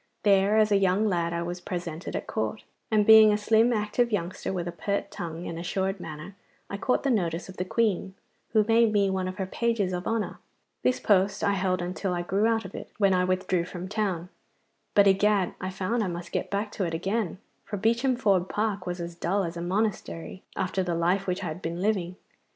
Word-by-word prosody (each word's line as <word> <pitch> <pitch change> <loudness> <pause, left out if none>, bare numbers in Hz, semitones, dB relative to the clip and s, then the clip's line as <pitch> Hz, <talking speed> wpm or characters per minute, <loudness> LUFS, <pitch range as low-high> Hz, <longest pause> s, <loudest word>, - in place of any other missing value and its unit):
There 200 +1 +4
as 215 -1 +4
a 200 - +5
young 195 +2 +2
lad 170 -3 0
I 170 0 -2
was 175 +1 -5
presented 175 -3 -5
at - - -3
Court, - - -3 0.3
and 215 -2 +3
being 220 0 +9
a 210 - +2
slim 220 +3 +3
active 230 +2 +1
youngster 185 -3 -2
with 175 -2 -3
a - - -2
pert 200 +4 -3
tongue 165 0 -6
and 165 - -5
assured 190 +2 -2
manner, 155 +4 -8 0.4
I 200 - -3
caught 250 - 0
the 275 - +2
notice 175 -5 -1
of 185 - -10
the 180 - -2
Queen, 195 -2 0 0.4
who 215 -1 +5
made 225 +1 +4
me 200 -2 +2
one 190 -1 -1
of 185 - -5
her 190 - -1
pages 210 -2 0
of 180 0 -3
honour. 225 -2 -2 0.4
This 255 - +1
post 200 0 +2
I 200 - +3
held 185 -2 0
until 180 +1 -2
I 175 - -2
grew 195 +5 +1
out 225 -2 +1
of 190 - -9
it, - - -7
when 200 -2 +4
I 180 0 +2
withdrew 185 -1 0
from 180 +1 -7
town, 190 -4 -2 0.7
but 200 - +7
egad! 195 -1 +3
I 185 - -2
found 195 +5 -1
I - - -1
must 175 -1 -6
get - - -2
back 205 +1 -2
to 200 - -3
it 165 -1 -2
again, 190 +2 -1 0.3
for 205 - -5
Beacham 235 +5 +2
Ford 195 -7 +2
Park 205 -3 -1
was 175 0 -3
as 170 0 -5
dull 190 +4 0
as 170 -1 -4
a 170 - -5
monastery 185 -1 -2
after 190 +1 -1
the 175 -2 -1
life 180 +4 +1
which 180 +2 -1
I - - -2
had 160 +3 -5
been 170 0 -4
living. 185 -3 0
190 Hz, 220 wpm, -27 LUFS, 180-210 Hz, 0.7 s, being